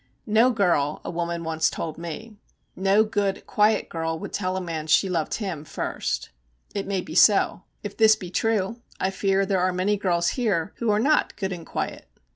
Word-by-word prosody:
'No 225 Hz, +3 st, +4 dB
girl,' 175 Hz, -, +1 dB
a -, -, -3 dB
woman 170 Hz, 0 st, -3 dB
once 160 Hz, 0 st, +1 dB
told 160 Hz, -1 st, -5 dB
me, 170 Hz, +7 st, -7 dB, 0.4 s
'no 195 Hz, +3 st, +4 dB
good, 205 Hz, -3 st, -1 dB
quiet 210 Hz, +1 st, +2 dB
girl 165 Hz, -1 st, -3 dB
would -, -, -8 dB
tell 185 Hz, -1 st, -1 dB
a -, -, 0 dB
man 165 Hz, -4 st, -4 dB
she 160 Hz, +5 st, +4 dB
loved 170 Hz, -4 st, -1 dB
him 185 Hz, -9 st, -4 dB
first.' 155 Hz, -, -3 dB, 0.4 s
It 200 Hz, -1 st, -3 dB
may 195 Hz, -2 st, -1 dB
be 160 Hz, -, -9 dB
so; 195 Hz, +1 st, +4 dB, 0.2 s
if 205 Hz, -1 st, -6 dB
this 220 Hz, -1 st, +6 dB
be 180 Hz, -4 st, -9 dB
true, 225 Hz, +1 st, 0 dB, 0.2 s
I 190 Hz, -, 0 dB
fear 195 Hz, 0 st, +1 dB
there 195 Hz, -1 st, +1 dB
are 185 Hz, 0 st, +2 dB
many 185 Hz, +3 st, 0 dB
girls 175 Hz, -3 st, +1 dB
here 205 Hz, -8 st, -1 dB
who 235 Hz, -, -1 dB
are 210 Hz, 0 st, +3 dB
not 300 Hz, +7 st, +2 dB
good 190 Hz, -2 st, -3 dB
and 170 Hz, -2 st, -9 dB
quiet. -, -, -4 dB
190 Hz, 195 wpm, -25 LUFS, 170-210 Hz, 0.4 s, this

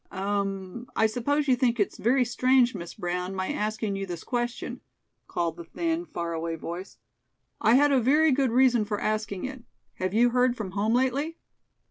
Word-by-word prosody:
"Um! 195 Hz, +2 st, -3 dB
I 220 Hz, -, +3 dB
suppose 285 Hz, +7 st, 0 dB
you 260 Hz, -, +5 dB
think 240 Hz, -2 st, +1 dB
it's 205 Hz, -, 0 dB
very 250 Hz, +3 st, +3 dB
strange, 255 Hz, +1 st, +3 dB
Miss 170 Hz, -4 st, -7 dB
Brown, 180 Hz, +2 st, -3 dB
my 190 Hz, 0 st, -2 dB
asking 215 Hz, -1 st, -2 dB
you 195 Hz, 0 st, -4 dB
this 175 Hz, -2 st, -6 dB
question," 240 Hz, 0 st, -3 dB, 0.5 s
called 170 Hz, -1 st, -2 dB
the 170 Hz, -, -7 dB
thin, 330 Hz, -, -2 dB
far 170 Hz, -, -4 dB
away 165 Hz, 0 st, -3 dB
voice. 170 Hz, -, -7 dB, 0.6 s
"I 225 Hz, +3 st, +5 dB
had 290 Hz, +2 st, +5 dB
a 270 Hz, -, +4 dB
very 300 Hz, +6 st, +4 dB
good 270 Hz, -1 st, +2 dB
reason 245 Hz, -1 st, +4 dB
for 205 Hz, -1 st, -3 dB
asking 215 Hz, -3 st, -2 dB
it. 260 Hz, -1 st, -6 dB, 0.4 s
Have 185 Hz, +2 st, -2 dB
you 240 Hz, +2 st, +4 dB
heard 250 Hz, 0 st, +2 dB
from 200 Hz, -4 st, -4 dB
home 210 Hz, +4 st, +1 dB
lately?" 275 Hz, +6 st, 0 dB
225 Hz, 180 wpm, -27 LUFS, 190-255 Hz, 0.6 s, you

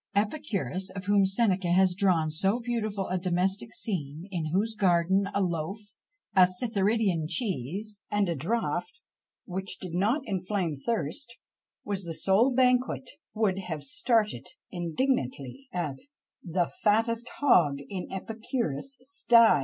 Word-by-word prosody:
Epicurus, 205 Hz, -4 st, -1 dB
of 195 Hz, 0 st, -6 dB
whom 200 Hz, -1 st, +4 dB
Seneca 195 Hz, -2 st, +1 dB
has 185 Hz, 0 st, +4 dB
drawn 175 Hz, -5 st, +2 dB
so 195 Hz, +9 st, +1 dB
beautiful 215 Hz, -5 st, -2 dB
a 185 Hz, 0 st, 0 dB
domestic 185 Hz, +4 st, 0 dB
scene, 165 Hz, -6 st, -4 dB
in 165 Hz, -4 st, -2 dB
whose 210 Hz, +6 st, +1 dB
garden 190 Hz, 0 st, +2 dB
a 200 Hz, -, 0 dB
loaf, 170 Hz, +2 st, -2 dB, 0.6 s
a 185 Hz, -1 st, +8 dB
Cytheridean 200 Hz, -4 st, +1 dB
cheese, 200 Hz, -, -2 dB
and 205 Hz, -1 st, +1 dB
a 170 Hz, -, 0 dB
draught 225 Hz, -, -2 dB, 0.5 s
which 190 Hz, 0 st, -4 dB
did 180 Hz, -3 st, -7 dB
not 210 Hz, -, +2 dB
inflame 185 Hz, -4 st, -1 dB
thirst, 225 Hz, -, -3 dB, 0.5 s
was 200 Hz, -2 st, -2 dB
the 165 Hz, -2 st, -5 dB
sole 205 Hz, +10 st, +3 dB
banquet, 255 Hz, 0 st, +2 dB, 0.2 s
would 205 Hz, -3 st, +1 dB
have 160 Hz, -6 st, -5 dB
started 235 Hz, -7 st, 0 dB, 0.2 s
indignantly 175 Hz, -, -2 dB
at 160 Hz, -, -3 dB, 0.4 s
The 175 Hz, 0 st, +1 dB, 0.2 s
fattest 225 Hz, +3 st, +2 dB
hog 170 Hz, -, +4 dB
in 185 Hz, -3 st, -5 dB
Epicurus' 225 Hz, -, -3 dB
sty! 240 Hz, -, +5 dB
195 Hz, 130 wpm, -28 LUFS, 175-225 Hz, 0.6 s, a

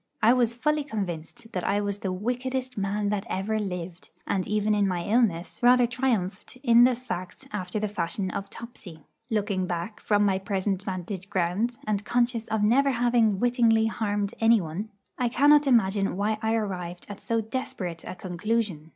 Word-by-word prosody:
I 230 Hz, +3 st, +7 dB
was 240 Hz, -2 st, +2 dB
fully 300 Hz, +4 st, +1 dB
convinced 200 Hz, -, -5 dB
that 180 Hz, -, -3 dB
I 205 Hz, -, +1 dB
was 205 Hz, -1 st, -2 dB
the 190 Hz, -, -2 dB
wickedest 250 Hz, +6 st, -3 dB
man 205 Hz, +1 st, -1 dB
that 205 Hz, -1 st, -1 dB
ever 215 Hz, +3 st, -1 dB
lived, 180 Hz, -3 st, -5 dB, 0.2 s
and 190 Hz, -2 st, -1 dB
even 210 Hz, 0 st, +1 dB
in 205 Hz, -1 st, +2 dB
my 180 Hz, -2 st, -1 dB
illness 200 Hz, -5 st, +1 dB
rather 245 Hz, 0 st, +6 dB
triumphed 235 Hz, -4 st, -2 dB
in 235 Hz, -1 st, +7 dB
the 250 Hz, -1 st, +3 dB
fact 185 Hz, -8 st, -6 dB
after 185 Hz, -1 st, -3 dB
the 215 Hz, -, -1 dB
fashion 190 Hz, 0 st, -2 dB
of 200 Hz, +1 st, -5 dB
Topsy. 190 Hz, -11 st, -10 dB, 0.2 s
Looking 205 Hz, -4 st, 0 dB
back 175 Hz, +4 st, -4 dB
from 205 Hz, -1 st, +2 dB
my 190 Hz, -1 st, +2 dB
present 195 Hz, 0 st, -1 dB
vantage 190 Hz, -1 st, -5 dB
ground, 200 Hz, +6 st, 0 dB
and 210 Hz, -1 st, -1 dB
conscious 240 Hz, 0 st, 0 dB
of 220 Hz, -1 st, 0 dB
never 265 Hz, +6 st, +4 dB
having 235 Hz, -5 st, +2 dB
wittingly 235 Hz, -2 st, +3 dB
harmed 205 Hz, -2 st, -1 dB
anyone, 215 Hz, -3 st, +2 dB, 0.3 s
I 245 Hz, -1 st, +2 dB
cannot 290 Hz, +4 st, +5 dB
imagine 200 Hz, -6 st, +2 dB
why 215 Hz, +2 st, 0 dB
I 220 Hz, 0 st, +1 dB
arrived 180 Hz, -5 st, -4 dB
at 205 Hz, -1 st, -8 dB
so 230 Hz, 0 st, 0 dB
desperate 210 Hz, -7 st, -4 dB
a 185 Hz, -, -7 dB
conclusion. 185 Hz, -3 st, -2 dB
210 Hz, 170 wpm, -26 LUFS, 190-235 Hz, 0.3 s, I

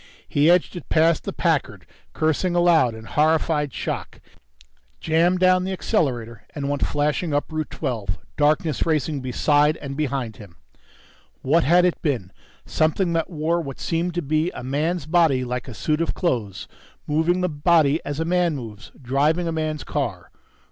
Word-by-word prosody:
He 145 Hz, +3 st, +3 dB
edged 175 Hz, +1 st, +3 dB
it 175 Hz, -, -9 dB
past 165 Hz, 0 st, +3 dB
the -, -, -2 dB, 0.2 s
Packard, -, -, 0 dB, 0.3 s
cursing 160 Hz, +3 st, 0 dB
aloud 170 Hz, -9 st, +4 dB
in 110 Hz, -, -10 dB
horrified 150 Hz, +2 st, +1 dB
shock, -, -, -5 dB, 0.8 s
jammed 170 Hz, +3 st, +2 dB
down 185 Hz, 0 st, +4 dB
the 190 Hz, -, -3 dB
accelerator 120 Hz, -, -1 dB
and 140 Hz, -2 st, -3 dB
went 145 Hz, 0 st, -1 dB
flashing 150 Hz, +2 st, 0 dB
up 145 Hz, -, -1 dB
Route 155 Hz, -1 st, -3 dB
Twelve, 110 Hz, -10 st, -3 dB, 0.2 s
darkness 155 Hz, +1 st, +1 dB
racing 155 Hz, -3 st, 0 dB
beside 145 Hz, +4 st, +2 dB
and 140 Hz, -1 st, -7 dB
behind 135 Hz, -6 st, -2 dB
him. 100 Hz, -6 st, -13 dB, 0.9 s
What 160 Hz, +5 st, +3 dB
had 175 Hz, +4 st, +5 dB
it 180 Hz, -, 0 dB
been? 120 Hz, -, -2 dB, 0.3 s
Something 170 Hz, +3 st, +1 dB
that 165 Hz, -1 st, -1 dB
wore 165 Hz, 0 st, -1 dB
what 135 Hz, -4 st, -7 dB
seemed 170 Hz, +1 st, -2 dB
to 175 Hz, -, -1 dB
be 155 Hz, +4 st, 0 dB
a -, -, -7 dB
man's 150 Hz, +5 st, -1 dB
body 155 Hz, -6 st, +2 dB
like 125 Hz, +1 st, -4 dB
a 125 Hz, -, -7 dB
suit 155 Hz, +7 st, -1 dB
of 165 Hz, -, -1 dB
clothes, 115 Hz, -, -2 dB, 0.4 s
moving 160 Hz, +4 st, +1 dB
the 180 Hz, -, +1 dB
body 155 Hz, 0 st, +2 dB
as 145 Hz, +1 st, -4 dB
a 165 Hz, -, 0 dB
man 175 Hz, -2 st, +1 dB
moves, 115 Hz, -5 st, -9 dB
driving 145 Hz, +7 st, +1 dB
a -, -, -1 dB
man's 155 Hz, -2 st, -2 dB
car -, -, -4 dB
155 Hz, 165 wpm, -23 LUFS, 135-170 Hz, 0.9 s, had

